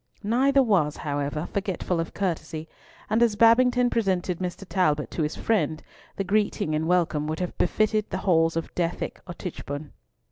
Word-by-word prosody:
Neither 265 +6 +3
was, 175 - +2
however, 145 +2 -2
forgetful 190 -3 -1
of 165 - -4
courtesy, 165 -4 -3 0.4
and 220 +2 +1
as 230 -3 +4
Babington 245 +3 +5
presented 185 -5 0
Mr. 180 +1 -4
Talbot 155 -7 +1
to - - -3
his 150 0 -1
friend, 160 -8 0 0.3
the 195 - -1
greeting 200 -5 0
and 155 +1 0
welcome 165 -4 +1
would 155 +1 -3
have 180 -1 -3
befitted 215 +3 +1
the - - -2
halls 165 -3 +3
of 165 - -4
Dethick 170 -1 -2
or 175 - -7
Tichborne. 150 -5 -6
180 Hz, 165 wpm, -26 LUFS, 160-215 Hz, 0.4 s, Babington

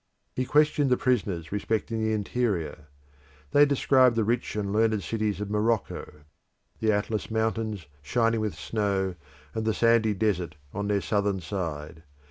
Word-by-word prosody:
He 130 - 0
questioned 150 0 +3
the 125 - +3
prisoners 100 -10 0
respecting 110 +2 -1
the 110 - +1
interior. 100 -9 -2 0.6
They 145 0 +6
described 130 -3 +4
the 115 - +2
rich 115 +2 -1
and 100 -2 -2
learned 110 -1 +2
cities 105 -4 -1
of 105 0 -4
Morocco: 105 -7 -1 0.6
the 110 -1 +2
Atlas 105 +1 -1
mountains, 110 -4 -1 0.2
shining 115 +8 +1
with 110 -2 -2
snow 100 -3 -1 0.4
and 110 - -2
the 110 -1 0
sandy 115 -2 +3
desert 90 -6 0 0.2
on 100 0 -3
their 100 -1 +1
southern 100 +1 0
side. 80 -4 -5
110 Hz, 145 wpm, -27 LUFS, 100-115 Hz, 0.6 s, They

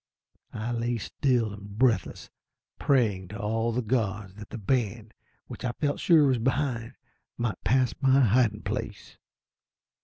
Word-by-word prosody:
I 110 +2 -3
lay 120 0 -1
still 115 0 0
and 100 0 -10
breathless, 115 -6 +1 0.5
praying 105 -9 +2
to 105 +3 -8
all 115 +2 0
the 125 +2 -1
gods 105 -4 -1
that 105 +1 -11
the - - -6
band, 110 0 -1 0.3
which - - -9
I 125 -1 -1
felt 145 +1 -1
sure 160 -4 +5
was 130 -3 +2
behind, 120 -1 -1 0.4
might 115 -6 -3
pass 130 0 +2
my 135 0 +5
hiding 115 -2 +2
place. 105 -1 -5
115 Hz, 145 wpm, -27 LUFS, 105-125 Hz, 0.5 s, sure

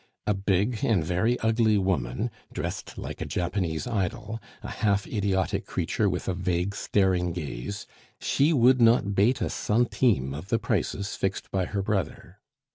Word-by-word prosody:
A 105 - +2
big 100 +4 0
and 100 -8 +3
very 95 +9 +1
ugly 110 -1 +3
woman, 95 - -1 0.2
dressed - - -5
like - - -6
a - - -1
Japanese 90 -3 -1
idol, 110 0 -2 0.2
a - - -5
half 100 -1 +1
idiotic 100 -3 -1
creature - - 0
with - - -3
a 95 - +1
vague, 90 +1 -1
staring 95 -4 +1
gaze 80 +3 -5 0.3
she 145 +4 +2
would 130 -3 +5
not 115 -3 +4
bate 105 +7 +3
a - - 0
centime 105 - +1
of 80 +7 -7
the 115 - +3
prices 105 -2 -1
fixed 95 0 -3
by 95 -1 0
her 100 +1 -2
brother. 100 -1 -3
100 Hz, 155 wpm, -27 LUFS, 90-115 Hz, 0.3 s, would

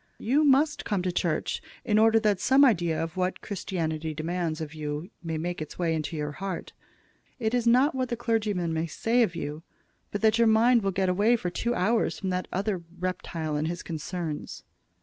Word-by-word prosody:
You 275 +7 +2
must 290 +1 +3
come 200 -4 -1
to 185 - 0
church, 170 -3 -1 0.2
in 215 0 +3
order 225 0 +5
that 210 -4 +2
some 270 +2 +5
idea 170 -9 +2
of 165 +1 -5
what 185 0 -1
Christianity 160 -5 -3
demands 165 0 -2
of 155 -1 -5
you 155 +4 -5
may 165 -2 -3
make 175 +1 -3
its 155 - -7
way 170 -2 +1
into 160 +1 -3
your 150 -1 -2
heart. 190 +3 -5 0.6
It 225 -2 -1
is 240 -1 +1
not 255 +6 +5
what 255 -1 -1
the 235 - -2
clergyman 210 -8 0
may 160 +1 -1
say 230 +9 +1
of 180 -7 +1
you, 150 -1 -4 0.5
but 205 - -4
that 220 +1 +4
your 230 - +5
mind 230 +2 +5
will 195 - 0
get 190 0 0
away 205 +6 +3
for 180 -6 -3
two 235 +6 -1
hours 220 +5 +1
from 190 - -3
that 180 0 -2
other 195 -1 -1 0.2
reptile 170 -3 -3
and 150 +1 0
his 175 +1 -4
concerns." 165 -1 -5
185 Hz, 200 wpm, -27 LUFS, 165-225 Hz, 0.6 s, order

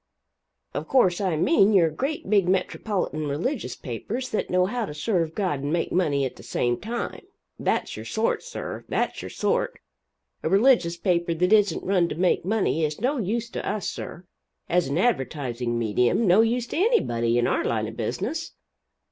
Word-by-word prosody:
Of - - -4
course 200 -9 +3
I 185 -4 +1
mean 210 - +4
your 170 -5 +5
great 275 - -3
big 195 -3 +3
metropolitan 185 -4 -1
religious 155 - -2
papers 215 - -5
that - - -2
know 180 0 +3
how 235 +4 -2
to 150 - -7
serve 165 -1 -1
God 185 -9 0
and 140 +2 -3
make 170 0 0
money 145 -6 +1
at 130 - -5
the - - -11
same 120 0 -1
time 235 +3 -4 0.4
that's - - -1
your 110 - -7
sort, 220 - 0
sir, - - -6
that's - - -1
your - - -6
sort - - -1 0.6
a - - -1
religious 195 -4 +4
paper 170 -1 0
that 180 +5 +2
isn't 210 -2 +3
run 180 -3 +2
to - - -4
make 180 +2 +2
money 190 -4 +1
is 150 0 -1
no 260 +5 0
use 230 +3 -1
to - - -4
us, 205 -1 -2
sir, 175 - -6 0.4
as 175 -2 +2
an 140 +3 -1
advertising 130 - 0
medium 120 - +2
no 190 +3 +6
use 235 +2 +1
to - - -3
anybody 120 - +2
in 120 - +2
our - - +1
line 110 -2 -1
of 110 - -8
business. 180 - -3
180 Hz, 180 wpm, -25 LUFS, 150-225 Hz, 0.6 s, no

